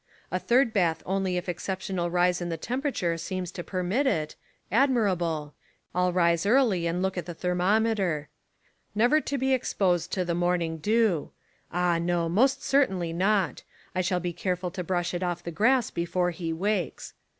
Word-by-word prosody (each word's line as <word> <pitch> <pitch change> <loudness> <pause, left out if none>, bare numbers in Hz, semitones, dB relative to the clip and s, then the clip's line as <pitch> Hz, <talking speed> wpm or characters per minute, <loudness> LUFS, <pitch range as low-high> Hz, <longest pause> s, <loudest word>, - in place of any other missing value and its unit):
A 185 - 0
third 235 +5 +3
bath 170 -5 +1
only 190 -1 0
if 180 - -4
an - - +1
exceptional 185 -1 -3
rise 180 0 +2
in 175 - -3
the 165 - -2
temperature 235 - -2
seems 185 -1 -4
to 175 - -6
permit 190 +11 0
it: 155 -11 0 0.4
Admirable. 185 - +1 0.4
I'll 180 0 +2
rise 170 -2 +2
early 210 -6 +3
and 175 +2 -1
look 190 -1 -1
at 170 - -7
the 175 - -6
thermometer 180 -2 +1 0.3
— - - -42 0.3
Never 245 +8 +4
to 280 - -3
be 265 0 +1
exposed 180 -8 0
to 185 -2 0
the 170 - -1
morning 175 -2 0
dew: 215 -3 +2 0.4
Ah, 175 -1 +1
no, 170 0 0
most 235 +11 +2
certainly 190 -12 +1
not. 190 0 +1 0.3
I 185 - +1
shall 180 0 0
be 175 0 -3
careful 180 0 -2
to 180 0 -4
brush 175 0 -1
it 175 - -2
off 175 -1 -2
the 170 - -5
grass 235 +8 +2
before 175 +1 0
he 170 -1 -4
wakes. 190 +2 -2
180 Hz, 175 wpm, -27 LUFS, 170-205 Hz, 0.4 s, Never